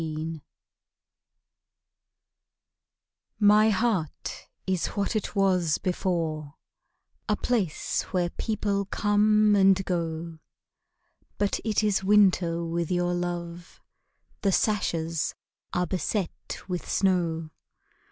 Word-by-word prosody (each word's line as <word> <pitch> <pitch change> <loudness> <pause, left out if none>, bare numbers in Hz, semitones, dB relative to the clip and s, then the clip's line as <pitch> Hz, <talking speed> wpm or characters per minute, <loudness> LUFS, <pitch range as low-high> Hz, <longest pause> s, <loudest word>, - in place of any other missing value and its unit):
ALMS 160 0 -4 3.0
My 210 +1 +6
heart 205 -7 -1 0.2
is 185 -2 0
what 200 +2 -2
it 215 - -2
was 185 -6 +2
before, 165 -5 -2 0.7
A 210 - +2
house 210 -11 0
where 175 -2 0
people 205 -2 -1
come 210 +1 +3
and 195 -1 +4
go; 165 -2 -3 1.0
But 205 -1 0
it 220 -1 +1
is 200 -2 +1
winter 185 -4 +3
with 170 0 -2
your 175 0 +1
love, 175 -1 -5 0.6
The 195 - +2
sashes 165 -6 0 0.4
are 180 0 0
beset 185 +2 -3
with 180 -2 -4
snow. 170 -4 +1
180 Hz, 95 wpm, -27 LUFS, 170-205 Hz, 3.0 s, My